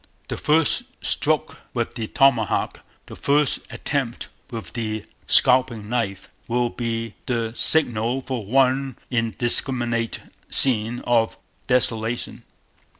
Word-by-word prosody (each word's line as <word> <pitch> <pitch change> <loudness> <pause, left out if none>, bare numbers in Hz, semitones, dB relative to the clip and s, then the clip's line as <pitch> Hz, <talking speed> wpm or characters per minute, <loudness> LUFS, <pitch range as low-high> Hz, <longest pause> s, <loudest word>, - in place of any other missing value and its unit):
The - - -3
first 155 0 +1 0.2
stroke - - 0 0.2
with - - -2
the 115 -2 -4
Tomahawk, 125 -5 +1 0.3
the - - -11
first 145 0 +1
attempt 135 -5 -3 0.2
with 115 -2 -8
the 110 -3 -3 0.2
Scalping 125 -4 +4
Knife, 115 -6 -2 0.2
will 120 0 0
be 115 -2 -4
the 115 -3 -2
Signal 125 -5 +2
for 125 -4 -4
one 130 +3 +1
indiscriminate 120 0 +1 0.3
scene 120 -2 +4
of 115 -2 +1 0.3
desolation. 115 -2 0
120 Hz, 105 wpm, -22 LUFS, 115-130 Hz, 0.3 s, Scalping